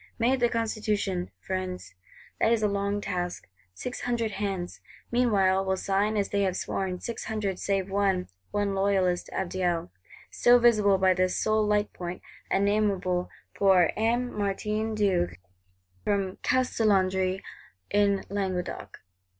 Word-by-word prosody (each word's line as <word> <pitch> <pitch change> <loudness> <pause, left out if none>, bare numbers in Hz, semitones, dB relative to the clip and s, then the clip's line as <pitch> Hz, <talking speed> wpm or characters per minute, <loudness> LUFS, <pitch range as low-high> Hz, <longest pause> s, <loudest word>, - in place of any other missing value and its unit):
Made 250 +3 +2
the 240 -1 +3
Constitution, 210 -5 -1
Friends! 185 - -4 0.5
That 225 - +3
is 230 -2 +2
a - - +4
long 200 0 -1
task. 180 -2 -3 0.3
Six 245 - -5
hundred 235 -3 -1
hands, 195 -4 -4 0.3
meanwhile, 200 -6 +3
will 190 0 0
sign 200 +3 0
as 200 - 0
they 200 - 0
have 190 -2 0
sworn: 185 -2 -2
six 235 - -5
hundred 210 -4 -2
save 195 -1 0
one; 195 -2 +1 0.2
one 205 -1 0
Loyalist 195 -2 +1
Abdiel, 175 -2 -1 0.4
still 245 0 +5
visible 215 -5 +4
by 190 0 +4
this 185 0 +1
sole 215 -1 +2
light 210 0 +1
point, 175 0 -6 0.3
and 195 - +2
nameable, 195 -4 +1 0.2
poor 190 -4 +4
"M. 240 +3 0
Martin 210 +2 -1
d'Auch, 190 -4 +1 0.7
from 195 -2 -1
Castelnaudary, 195 -7 +1 0.5
in 200 -1 +2
Languedoc." 190 -3 -4
200 Hz, 135 wpm, -27 LUFS, 185-215 Hz, 0.7 s, still